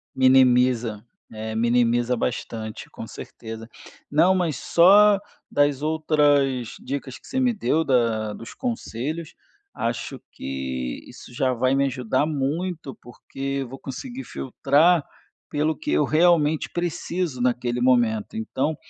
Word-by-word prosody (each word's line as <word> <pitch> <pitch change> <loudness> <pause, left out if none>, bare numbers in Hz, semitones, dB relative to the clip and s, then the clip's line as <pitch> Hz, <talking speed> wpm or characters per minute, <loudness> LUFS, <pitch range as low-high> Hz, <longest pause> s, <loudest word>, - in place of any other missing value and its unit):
Minimiza. 125 -4 +4 0.3
É, 110 0 -5
minimiza 120 +1 +2
bastante, 115 -2 -4
com - - -8
certeza. 115 0 -9 0.4
Não, 175 +6 +4
mas 170 -7 0
só 200 +7 +6 0.3
das 145 -1 +2
outras 145 -5 +1
dicas 135 -2 -5
que - - -20
você 260 - -2
me 250 -1 +3
deu, 165 -7 +1
da 115 -5 +1
dos 115 - -10
conselhos, 160 - -4 0.4
acho 115 0 -3
que 65 -2 -5
isso 125 - -13
já 130 +1 +1
vai 130 +2 +1
me 140 0 +2
ajudar 130 0 0
muito, 155 +1 -3
porque 135 +3 -5
eu 125 - -6
vou 135 - -9
conseguir 250 - -7
filtrar 145 +5 +2 0.5
pelo 155 +1 0
que - - -4
eu 75 - +3
realmente 160 -2 +3
preciso, 175 -4 -2
naquele 125 0 0
momento, 120 -5 +2
então, 130 +7 -2
130 Hz, 125 wpm, -24 LUFS, 120-155 Hz, 0.5 s, só